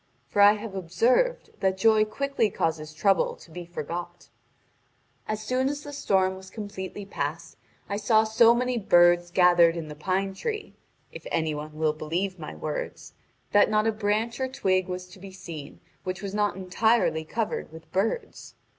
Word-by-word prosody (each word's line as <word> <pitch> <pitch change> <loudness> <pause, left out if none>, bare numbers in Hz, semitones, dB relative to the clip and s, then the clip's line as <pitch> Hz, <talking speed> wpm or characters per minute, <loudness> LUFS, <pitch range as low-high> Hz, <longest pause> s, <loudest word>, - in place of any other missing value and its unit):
For 205 - +2
I 205 +1 +8
have 215 -1 -6
observed 235 - +1
that 190 -1 +1
joy 215 +1 +4
quickly 275 0 0
causes 160 -4 -2
trouble 190 +4 +2
to 165 - -17
be 175 +1 -8
forgot. 175 +1 -6 1.0
As 215 0 -3
soon 255 +4 0
as 290 +1 -4
the 290 - -8
storm 190 -8 +1
was 190 0 -11
completely 205 -2 -7
past, 155 -4 -4 0.3
I 200 - -2
saw 220 +1 +4
so 225 +1 +5
many 250 0 0
birds 175 -2 +5
gathered 175 -1 +5
in 160 -2 -5
the 150 - -7
pine 190 +5 -1
tree 430 - -4 0.4
(if - - -9
any 160 -1 0
one 150 +1 -7
will 155 -1 +1
believe 175 +5 -3
my 155 - -7
words) 155 -1 -5 0.4
that 205 0 +5
not 215 0 +2
a 225 - +3
branch 215 +3 -1
or 260 - 0
twig 185 -7 0
was 180 0 -5
to 190 +1 -14
be 195 +1 -10
seen 160 -6 -9 0.2
which 185 +1 -4
was 200 -1 -4
not 210 0 +1
entirely 190 -2 +1
covered 220 0 -3
with 160 0 -13
birds. 205 - -2
190 Hz, 170 wpm, -26 LUFS, 175-220 Hz, 1.0 s, I